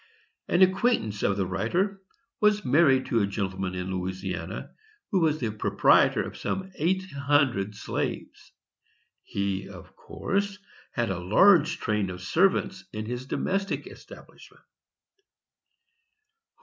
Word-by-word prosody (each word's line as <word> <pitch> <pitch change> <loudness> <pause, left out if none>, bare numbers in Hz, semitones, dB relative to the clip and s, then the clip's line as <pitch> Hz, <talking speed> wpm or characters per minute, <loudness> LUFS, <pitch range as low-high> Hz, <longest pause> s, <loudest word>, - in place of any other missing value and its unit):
An 185 - +4
acquaintance 185 - +1
of 100 - +1
the 95 - 0
writer 170 - -1 0.4
was 210 -2 +3
married 135 -1 +4
to 115 - +1
a 100 - +1
gentleman 95 -2 -3
in 90 +1 -4
Louisiana, 95 0 -4 0.4
who 195 - +3
was 155 -2 +2
the 115 -4 -2
proprietor 105 - +3
of - - -8
some 190 0 -4
eight 185 +4 0
hundred 140 -8 +1
slaves. - - -5 0.7
He, 100 -1 -3
of - - -13
course, 200 0 -3 0.4
had 120 -4 -1
a 90 - -3
large 160 - +5
train 105 -4 -1
of 90 0 -7
servants 165 - +1
in 110 0 -5
his 125 +3 -5
domestic 195 +6 -2
establishment. - - -14
120 Hz, 125 wpm, -27 LUFS, -, 0.7 s, large